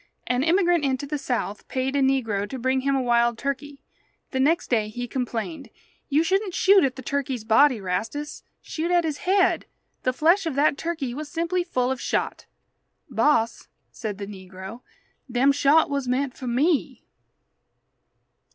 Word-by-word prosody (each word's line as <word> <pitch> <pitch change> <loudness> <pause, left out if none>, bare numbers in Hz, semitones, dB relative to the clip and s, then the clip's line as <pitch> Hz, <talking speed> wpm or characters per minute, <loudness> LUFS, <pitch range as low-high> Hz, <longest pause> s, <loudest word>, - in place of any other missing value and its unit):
An 250 0 0
immigrant 345 +1 +3
into 270 0 0
the 295 +1 -3
South 245 -6 -3
paid 265 +1 -2
a 280 - +2
negro 225 -7 +1
to 265 - -5
bring 260 +1 0
him 275 +1 +1
a 265 - +1
wild 235 -1 +2
turkey. 280 +2 -4 0.5
The 265 - -1
next 315 +5 +2
day 220 -3 +2
he 245 +3 -5
complained: 260 +4 -4 0.4
"You 300 +2 +3
shouldn't 380 +2 0
shoot 390 -1 +5
at 265 -2 0
the 260 - -9
turkey's 265 -3 -2
body, 230 +3 +4
Rastus. 225 +11 -4 0.2
Shoot 330 +2 -3
at 350 -1 +3
his 310 -3 -3
head. 380 -1 +3 0.3
The 255 - +1
flesh 335 +8 +3
of 305 - -2
that 290 +1 +3
turkey 310 -6 -3
was 295 +3 -6
simply 340 +3 -1
full 255 -8 -1
of 265 - -3
shot." - - -2 0.6
"Boss," 230 -6 +1 0.2
said 210 -4 -5
the 200 - -5
negro, 190 +3 -10 0.5
"dem 255 +3 +4
shot 285 +3 +4
was 280 -2 -2
meant 255 +1 -1
for 255 - -7
me." 280 +6 0
270 Hz, 165 wpm, -24 LUFS, 245-310 Hz, 0.6 s, shoot